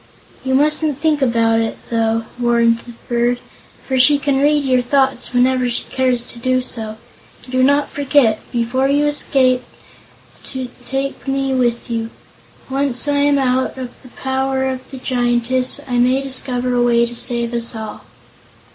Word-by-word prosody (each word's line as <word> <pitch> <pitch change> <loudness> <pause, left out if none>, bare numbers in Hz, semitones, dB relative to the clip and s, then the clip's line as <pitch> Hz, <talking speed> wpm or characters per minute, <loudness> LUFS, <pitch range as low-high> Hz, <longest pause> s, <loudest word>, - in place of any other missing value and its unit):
"You 260 0 0
mustn't 300 0 +1
think 300 -1 0
about 230 -3 +2
it, 225 0 -2
though," 225 0 0
warned 235 -1 +2
the 240 - -12
bird, 240 0 0 0.5
"for 260 -1 0
she 285 +3 +5
can 275 -1 0
read 295 0 +3
your 255 -2 +2
thoughts 265 0 0
whenever 250 0 +2
she 235 - -1
cares 255 -2 +1
to 235 - -9
do 255 +1 +1
so. 220 -3 -5 0.5
And 250 - -13
do 255 0 +1
not 285 +2 +2
forget, 280 -6 +2
before 245 +3 0
you 290 +1 +2
escape, 260 -3 +2 0.8
to 260 -2 -6 0.2
take 275 +1 -4
me 270 0 -1
with 240 -2 -1
you. 225 -1 -2 0.6
Once 270 -1 0
I 290 0 +1
am 285 0 +3
out 260 0 0
of 255 -2 -8
the 255 - -15
power 265 +1 -2
of 260 -1 -5
the 270 - -8
Giantess, 250 0 +1
I 245 -2 0
may 255 +2 +3
discover 255 -2 +1
a 245 - +2
way 235 -1 +3
to 235 - -3
save 235 0 +3
us 235 -1 -2
all." 220 -1 -7
255 Hz, 165 wpm, -18 LUFS, 240-270 Hz, 0.8 s, she